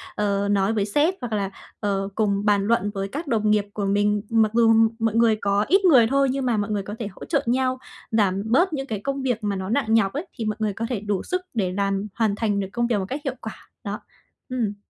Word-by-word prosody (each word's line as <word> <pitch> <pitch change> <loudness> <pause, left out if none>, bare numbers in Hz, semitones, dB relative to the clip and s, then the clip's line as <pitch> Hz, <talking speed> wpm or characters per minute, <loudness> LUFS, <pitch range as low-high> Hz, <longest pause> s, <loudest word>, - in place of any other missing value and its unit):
ờ, 200 -1 0
nói 200 +2 +2
với 205 -2 0
sếp, 295 - +2
hoặc 235 -3 -4
là, 200 -2 -1 0.3
ờ, 195 -1 -1
cùng 205 -1 0
bàn 205 -1 +3
luận 205 -3 +1
với 195 0 -3
các 295 - -6
đồng 215 -4 +1
nghiệp 210 -1 +2
của 205 -2 -2
mình, 205 +1 +2
mặc 220 -2 +3
dù 225 -1 +5 0.3
mọi 225 -1 0
người 230 -1 +4
có 200 +1 +1
ít 385 +1 +3
người 250 -10 +6
thôi 275 +2 +2
nhưng 270 -1 -2
mà 235 -3 +1
mọi 205 0 -1
người 200 -2 -1
có 205 +2 -6
thể 215 - -3
hỗ 190 - -10
trợ 285 -4 0
nhau, 255 +1 +1 0.3
giảm 200 -3 +1
bớt 320 - +2
những 270 -1 -3
cái 215 -3 -3
công 275 +4 -3
việc 245 -4 -1
mà 205 -1 -1
nó 190 0 -4
nặng 225 -2 +1
nhọc 200 -4 +3
ấy, 310 +6 -4
thì 225 - -3
mọi 215 - -1
người 215 -2 0
có 230 +3 -3
thể 240 -6 -1
đủ 205 -2 -2
sức 365 0 -2
để 195 -6 0
làm 195 0 0
hoàn 220 -3 +1
thành 210 -2 0
được 195 - -2
công 235 0 0
việc 230 -4 +1
một 190 - -2
cách 285 +3 -4
hiệu - - -3
quả. - - -9
Đó. - - -4 0.5
Ừm. 230 -5 -1
215 Hz, 260 wpm, -23 LUFS, 200-245 Hz, 0.5 s, người